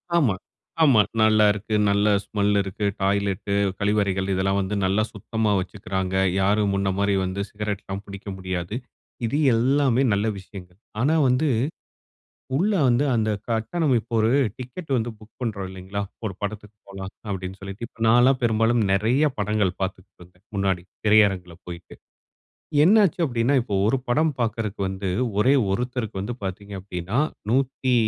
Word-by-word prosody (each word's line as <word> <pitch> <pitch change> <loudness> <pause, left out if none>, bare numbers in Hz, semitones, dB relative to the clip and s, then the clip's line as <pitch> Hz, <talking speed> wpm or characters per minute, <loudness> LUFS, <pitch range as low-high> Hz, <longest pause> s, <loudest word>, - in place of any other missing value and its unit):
ஆமா, 135 - +3 0.5
ஆமா. 130 -8 +6 0.2
நல்லா 110 -1 +5
இருக்கு. 105 +1 -3
நல்ல 100 +1 +2 0.2
ஸ்மெல் 105 -1 +1
இருக்கு. 100 +2 -4 0.2
டாய்லெட்டு. 100 0 0 0.3
கழிவறைகள் 100 -2 +1
இதெல்லாம் 95 +1 +1
வந்து 95 +2 -2
நல்லா 100 +3 +2
சுத்தமா 110 +1 -1
வச்சுக்கிறாங்க. 95 -1 -3 0.3
யாரும் 100 +1 +2
முன்ன 100 0 0
மாதிரி 100 0 +2
வந்து 95 +2 -3
சிகரெட்லாம் 100 -1 -5
பிடிக்க 100 +1 -10
முடியாது. 95 +1 -4 0.5
இது 115 +6 -1 0.2
எல்லாமே 130 +1 +2
நல்ல 100 +1 0
விஷயங்கள். 90 -1 -12 0.2
ஆனா, 145 +5 +3
வந்து 130 +5 +2 1.1
உள்ள 200 +8 +2 0.2
வந்து 125 +3 +3
அந்த 110 -2 +1 0.2
கட்டணம் 120 +6 0
இப்போ 115 - -19
ஒரு 110 +1 +3 0.3
டிக்கெட் 130 +6 -8
வந்து 120 0 -1
புக் 110 0 -17
பண்ணுறோம் 105 -6 -3
இல்லங்களா? 95 +2 -6 0.2
ஒரு 100 -4 -3
படத்துக்கு 105 0 -5
போலாம் 95 -1 -7 0.2
அப்பிடின்னு 95 -1 -5
சொல்லிட்டு. 100 +4 -6
இப்போ 115 - -25
நான் 115 +2 +6
எல்லாம் 130 +1 +4
பெரும்பாலும் 115 0 +2
நெறைய 115 +9 +2
படங்கள் 105 -2 0
பாத்துக்கிட்டுருந்தேன். 90 -1 -7
முன்னாடி 95 -3 0 0.2
திரையரங்கில 100 -5 +3
போயிட்டு. 85 -1 -9 0.9
என்னச்சி 200 0 +4
அப்படின்னா, 120 -1 +1
இப்போ 110 -4 -4
ஒரு 115 - +3
படம் 155 +6 +2
பாக்குறதுக்கு 110 -3 -2
வந்து 95 0 -4 0.3
ஒரே 130 +6 +4 0.2
ஒருத்தருக்கு 115 -1 -2
வந்து 110 +5 -4
பாத்தீங்க 100 +1 -6
அப்படின்னா, 90 +4 -4 0.3
நூத்தி 130 0 +1
105 Hz, 140 wpm, -24 LUFS, 95-120 Hz, 1.1 s, ஆமா